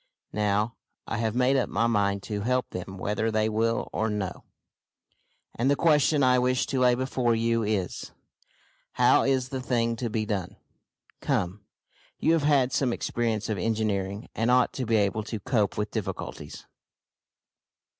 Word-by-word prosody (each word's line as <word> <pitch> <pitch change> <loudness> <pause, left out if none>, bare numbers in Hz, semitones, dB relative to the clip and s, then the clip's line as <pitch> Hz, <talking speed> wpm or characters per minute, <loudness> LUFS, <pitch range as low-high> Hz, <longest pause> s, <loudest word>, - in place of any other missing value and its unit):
Now, 105 +2 0 0.3
I 115 - -3
have 110 -1 -1
made 125 +2 +3
up 130 - 0
my 115 +4 +1
mind 100 -3 +1
to 105 -2 -4
help 125 +3 0
them 95 +1 -6
whether 105 +4 -1
they 110 0 +1
will 115 +1 0
or 110 +1 0
no, 100 -3 -4 1.1
and 125 +4 0
the 140 - +4
question 150 -2 +3
I 125 -1 +4
wish 125 0 +1
to 130 - +1
lay 125 -1 +4
before 125 -2 0
you 115 0 +1
is, 105 -5 -2 0.8
how - - +4
is 130 -1 +1
the 130 0 -4
thing 115 -2 0
to 120 0 -2
be 110 0 -1
done? 100 -4 -3 0.6
Come, 95 +3 -2 0.5
you 160 - +2
have 165 - +2
had 140 -3 +3
some 130 -3 +1
experience 115 -2 -2
of 105 -4 -2
engineering, 105 -1 -1
and 115 +2 0
ought 125 0 +3
to 130 -3 -4
be 115 - +2
able 105 0 +1
to 110 - -4
cope 110 -3 0
with 105 0 -2
difficulties." - - -6
115 Hz, 165 wpm, -27 LUFS, 105-125 Hz, 1.1 s, the